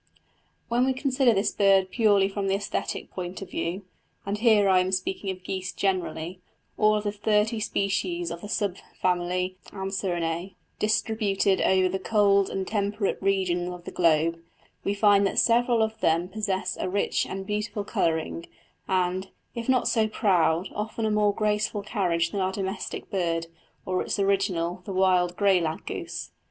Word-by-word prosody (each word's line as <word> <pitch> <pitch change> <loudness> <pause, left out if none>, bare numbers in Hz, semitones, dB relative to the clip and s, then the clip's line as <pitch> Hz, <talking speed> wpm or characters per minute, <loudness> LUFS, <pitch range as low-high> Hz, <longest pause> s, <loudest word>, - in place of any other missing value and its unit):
When 240 +1 +2
we 265 - +2
consider 260 -1 +2
this 200 -1 +1
bird 195 -2 +3
purely 205 -4 +4
from 195 0 -3
the 195 - +2
æsthetic 200 0 -3
point 180 0 -5
of 185 - -12
view 180 +4 -3 0.4
and 200 +1 -2
here 215 -3 +5
I 190 -1 +5
am 185 +1 0
speaking 190 +1 -2
of 185 -1 -5
geese 185 -1 -4
generally, 180 -2 -2 0.4
all 215 0 +4
of 210 - -1
the 205 - -1
thirty 210 +2 +1
species 185 -5 -1
of 170 0 -6
the 205 - -8
sub 200 -4 -1 0.2
family 180 +1 0
Anserinæ, 185 -2 -3 0.2
distributed 210 -2 +1
over 185 -1 +3
the 190 +1 -2
cold 200 -2 +3
and 190 -1 -3
temperate 205 -1 -1
regions 185 -3 +1
of 180 -1 -9
the - - -7
globe 165 0 +2 0.4
we 200 - 0
find 200 -1 +4
that - - -4
several 235 -1 +4
of 220 0 -3
them 165 +2 +2
possess 200 -2 -2
a - - -1
rich 200 +2 0
and 190 0 -5
beautiful 210 +1 -2
colouring, 165 -2 -1 0.4
and, 185 0 0 0.3
if 235 +1 -5
not 255 -2 +3
so 220 -1 +2
proud, 185 -4 +2
often 220 +2 -3
a 215 - +1
more 210 -1 +3
graceful 210 0 -1
carriage 175 -6 0
than 200 - -2
our 185 0 +1
domestic 195 +2 -5
bird, 170 -4 0 0.4
or 185 0 0
its - - -2
original, 190 -3 0
the 195 - -5
wild 180 -2 +2
grey 195 -3 +4
lag 160 -1 -3
goose. - - -5
195 Hz, 170 wpm, -26 LUFS, 180-210 Hz, 0.4 s, here